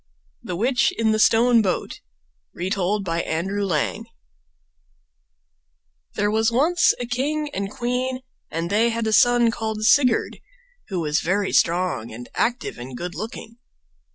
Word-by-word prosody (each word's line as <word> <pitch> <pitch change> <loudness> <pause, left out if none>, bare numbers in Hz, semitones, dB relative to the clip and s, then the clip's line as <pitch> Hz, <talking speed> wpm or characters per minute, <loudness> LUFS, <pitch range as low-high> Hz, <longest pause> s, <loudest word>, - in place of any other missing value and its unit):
THE 180 - -5
WITCH 245 +7 +2
IN 225 -1 +2
THE 215 - +1
STONE 230 +2 +5
BOAT 190 -4 -3 0.5
Retold 195 +2 -1
by 165 -1 -1
Andrew 190 +6 -2
Lang 165 -7 -1 2.1
There 205 0 +1
was 220 +1 +2
once 325 +9 +3
a 245 - -3
king 290 +5 -2
and 195 -5 -3
queen, 250 +3 -2 0.3
and 165 +2 -3
they 225 +3 +3
had 230 0 -2
a 220 - 0
son 240 0 +5
called 220 -1 -4
Sigurd, 250 -3 +3 0.5
who 185 -4 -3
was 150 -1 0
very 195 +3 0
strong 170 -9 +1
and 120 +2 -9
active 240 - -2
and 125 +1 -8
good 175 +4 -5
looking. 230 0 -7
220 Hz, 140 wpm, -22 LUFS, 180-240 Hz, 2.1 s, STONE